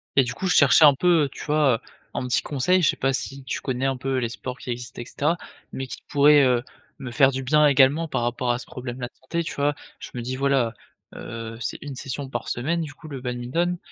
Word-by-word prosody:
Et 135 - +6
du 125 - -4
coup 190 - -3
je 180 - +2
cherchais 140 +2 +7
un 145 -2 +7
peu, 165 -1 +3
tu - - -9
vois, 150 -4 +3
heu, - - -5 0.3
un - - -3
petit 125 - +2
conseil, 155 +7 +1
je 160 - +4
sais - - +1
pas 135 0 0
si 135 +1 -4
tu 130 - -4
connais 130 -1 -2
un 135 -1 0
peu 130 +1 -2
les 120 -2 -1
sports 125 +2 -6
qui 125 - -6
existent 120 0 -6
et - - -7
cetera, 150 +7 0 0.4
mais 135 - -4
qui 120 - -8
pourraient, 145 0 +6
heu, 125 -2 +2 0.4
me 130 -2 -6
faire 135 +2 +5
du 135 0 -4
bien 150 +3 +4
également 145 +3 +4
par 120 - -2
rapport 120 +1 0
à 120 - 0
ce 125 - -9
problème 125 0 -7
là 125 - -3
de - - -22
santé, 170 +6 -2
tu - - -5
vois? 145 +1 0 0.2
Je - - -8
me 120 - -3
dis: 130 +2 -3
«Voilà, 135 -4 +1 0.4
heu, 115 -1 -7
c'est 125 - -3
1 145 -2 -7
session 135 +1 -5
par 120 -3 -5
semaine 160 +8 -1
du 150 -2 -6
coup 155 - -13
le 140 -4 -7
badminton, 130 +9 -1
135 Hz, 260 wpm, -24 LUFS, 125-145 Hz, 0.4 s, cherchais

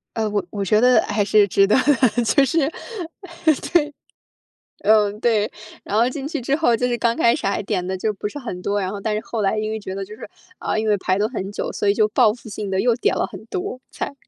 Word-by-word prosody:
呃， 220 -1 0
我 205 -2 -1
我 200 -1 -3
觉 210 +3 +3
得 250 +1 +5
还 205 0 0
是 205 +1 +4
值 195 +1 +3
得 210 - +3
的， 255 -3 +3
就 270 +5 +4
是 300 +5 +1
哎， 275 - +1 1.0
对， 300 -4 +3 0.9
嗯， 210 -1 +3
对， 220 -3 +2 0.3
然 205 - -2
后 230 +3 +4
进 275 +2 -5
去 305 -4 -3
之 270 +3 0
后， 285 -7 +3
就 250 - 0
是 240 -1 -1
刚 235 0 +1
开 235 - +4
始 - - -3
还 200 +1 0
点 190 -3 -2
得 190 +1 -2
就 210 +3 -1
不 205 +1 -4
是 290 - -8
很 230 -9 -6
多， 200 +2 -1
然 185 -1 -2
后 205 - -6
但 215 +1 -1
是 210 - -1
后 225 - -4
来 200 +2 +1
因 215 0 -2
为 220 0 -3
觉 190 -2 -6
得 195 0 -4
就 210 +2 -11
是， - - -10 0.3
啊， - - -2
因 220 0 -1
为 210 - +4
排 185 0 0
了 210 +2 +1
很 195 -6 -5
久， 205 - -4
所 205 - -1
以 200 - +4
就 215 0 +3
报 215 0 +4
复 240 - -13
性 205 -1 -5
地 190 0 +1
又 240 +1 +3
点 - - +1
了 - - 0
很 - - -10
多 375 -8 -4
菜。 - - -5
215 Hz, 280 characters per minute, -21 LUFS, 205-245 Hz, 1.0 s, 得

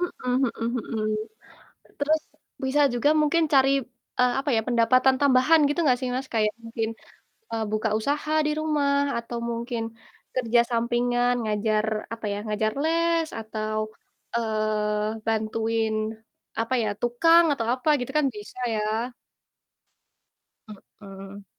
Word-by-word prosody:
Mhm 255 -8 -3 0.3
mhm 235 +1 -1
mhm. 215 -1 -1 0.9
Terus 310 +2 +2 0.4
bisa 265 +3 +2
juga 245 +5 +3
mungkin 320 +2 +3
cari, 270 0 +5 0.5
eee, 250 -1 +3
apa 285 - -2
ya, - - +3
pendapatan 255 +2 +4
tambahan 285 +4 +5
gitu 290 - -2
gak 250 -1 +3
sih, 255 - -2
Mas? 260 +1 -3
Kayak 215 -1 +2
mungkin, 225 -1 -2 0.6
eee, 225 -1 -1
buka 215 +1 0
usaha 295 +6 -1
di - - +1
rumah, 285 -2 +1
atau 235 0 -5
mungkin 235 0 -3 0.5
kerja 240 -2 +3
sampingan 245 +1 +1
ngajar, 215 0 0 0.3
apa 225 -1 -7
ya, 200 - -2
ngajar 215 +1 0
les, 335 0 +2
atau, 215 0 -3 0.6
eee, 215 -1 -1
bantuin, 225 0 0 0.7
apa 230 +3 -1
ya, 215 - 0
tukang, 330 +8 +5
atau 230 -5 -2
apa 255 +4 -4
gitu 245 - -4
kan 295 - +3
bisa 210 +4 -10 0.2
ya. - - -1 2.2
Mhm. 195 0 -10
235 Hz, 130 wpm, -25 LUFS, 220-275 Hz, 2.2 s, cari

